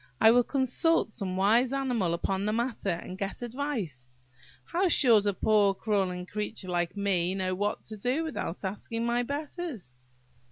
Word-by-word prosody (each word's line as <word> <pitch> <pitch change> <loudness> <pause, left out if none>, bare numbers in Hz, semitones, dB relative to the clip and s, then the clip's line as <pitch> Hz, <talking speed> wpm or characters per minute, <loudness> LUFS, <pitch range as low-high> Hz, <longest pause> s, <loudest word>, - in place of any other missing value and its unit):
I 220 - +7
will 245 +1 +5
consult 270 +2 +1
some 185 -3 -4
wise 230 +6 +3
animal 245 -11 0
upon 190 +3 -1
the 210 - +1
matter, 235 -3 -1
and 180 +2 -4
get 195 +4 -4
advice. 230 - -4 0.6
How 365 +3 +1
should 230 - +5
a 205 - +2
poor 205 -2 +3
crawling 190 -4 -1
creature 210 -1 -5
like 175 +1 -1
me 190 -2 +1
know 185 -1 -1
what 205 +3 -2
to 215 - -9
do 250 +9 0
without 280 - -4
asking 230 +4 -3
my 240 +1 +1
betters?" 285 - -5
210 Hz, 160 wpm, -29 LUFS, 190-250 Hz, 0.6 s, I